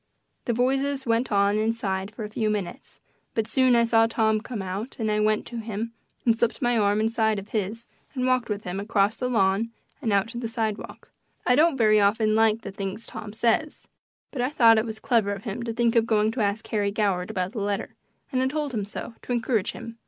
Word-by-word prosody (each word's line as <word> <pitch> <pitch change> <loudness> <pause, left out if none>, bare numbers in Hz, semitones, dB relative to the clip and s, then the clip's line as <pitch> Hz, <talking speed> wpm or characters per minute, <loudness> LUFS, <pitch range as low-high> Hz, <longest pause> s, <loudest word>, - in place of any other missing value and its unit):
The 240 - 0
voices 270 +3 0
went 230 +1 +1
on 200 +1 +3
inside 205 -4 -1
for 220 +1 -8
a 210 - -5
few 215 0 -1
minutes, 205 -4 -4 0.4
but 225 - +1
soon 260 +1 +3
I 235 - +5
saw 225 -1 +4
Tom 220 -1 +1
come 225 -3 -5
out 195 +7 -5
and 220 -2 -1
I 210 - +1
went 215 0 +1
to 240 - -7
him 225 0 -4 0.3
and 230 -2 +4
slipped 235 -1 +1
my 240 -1 +1
arm 205 -1 +2
inside 220 -1 +1
of 200 +1 -7
his 220 +2 -2 0.3
and 255 -1 0
walked 255 -2 +1
with 210 0 -3
him 180 +2 -4
across 205 +1 +1
the 250 - -2
lawn 200 -1 +2 0.3
and 230 -6 0
out 200 +1 +2
to 235 0 -6
the 235 - -3
sidewalk. 220 -2 -4 0.3
I 250 - +4
don't 310 0 +4
very 215 -3 +5
often 215 +2 +3
like 220 0 +3
the 200 - -6
things 195 +3 -5
Tom 220 -2 -8
says, 235 +7 0 0.4
but 260 - -3
I 250 - +1
thought 230 -6 +6
it 225 - -2
was 220 -1 -6
clever 215 -3 +1
of 200 0 -8
him 225 +1 -4
to 230 - -2
think 235 0 +1
of 230 -1 +3
going 215 -1 +2
to 235 0 -3
ask 205 +1 -1
Harry 205 -2 +1
Goward 200 -3 0
about 185 -3 -2
the 220 -3 -4
letter, 205 +1 -2 0.4
and 255 - +1
I 260 - +2
told 295 0 -2
him 210 -3 -1
so 210 +3 -7
to - - -7
encourage 230 -3 0
him. 230 0 -9
220 Hz, 225 wpm, -25 LUFS, 205-235 Hz, 0.4 s, thought